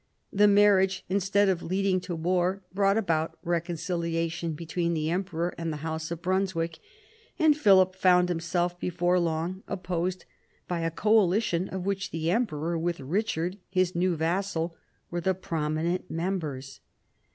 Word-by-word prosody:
The 210 +1 +5
marriage, 200 -2 +4
instead 200 +1 +2
of 185 -3 +1
leading 190 +1 +1
to 175 - -5
war, 180 +3 0
brought 195 +1 +3
about 165 -7 0
recon 170 0 -1
ciliation 165 -1 -2
between 170 +1 -2
the 155 0 -1
Emperor 175 -2 -2
and 165 -1 -2
the 150 - -4
house 160 0 -3
of 170 0 -6
Brunswick, 185 -3 -1 0.6
and 315 -3 +5
Philip 190 -9 +5
found 180 -1 +4
himself 175 +1 -1
before 175 +1 +1
long 170 +2 -2
opposed 180 -1 -3 0.4
by 175 -1 -2
a 165 0 0
coalition 195 -1 +2
of 185 -1 -5
which 195 0 -1
the 165 +1 -1
Emperor 170 -7 0
with 170 +1 -1
Richard, 180 +4 -2
his 185 -1 +1
new 180 0 +1
vassal, 165 0 -1 0.4
were 175 0 -2
the 190 +1 +1
prominent 165 +1 -2
members. 160 -6 -3
175 Hz, 145 wpm, -27 LUFS, 165-190 Hz, 0.6 s, The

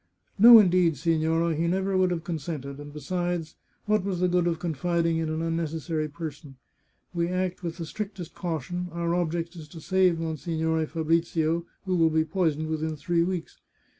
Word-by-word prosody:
No, 235 +2 +11
indeed, 180 -6 +4
signorina. 165 +2 +1
He 165 +2 0
never 190 +2 0
would 185 -1 +3
have 170 -2 -2
con 170 -2 -3
sented. 140 -3 -6
And 145 0 -9
besides, 175 +1 -3 0.3
what 210 -2 +2
was 190 -2 -2
the 180 - +3
good 175 -1 +2
of 170 -1 0
confiding 170 0 0
in 160 -1 -1
an 160 +1 -2
unnecessary 165 -1 -2
person? 150 -2 -8 0.6
We 170 -1 0
act 185 0 -2
with 170 -1 -5
the 170 - -4
strictest 195 -1 -6
caution; 175 +1 -3
our 170 0 -1
object 170 0 -1
is 160 -3 -9
to 165 +2 -11
save 185 0 +2
Monsignore 160 0 -1
Fabrizio, 165 +1 0 0.2
who 185 -1 0
will 165 -2 +4
be 160 0 +1
poisoned 160 -3 0
within 160 0 -2
three 170 +3 0
weeks. 175 -1 -3
165 Hz, 175 wpm, -27 LUFS, 160-180 Hz, 0.6 s, No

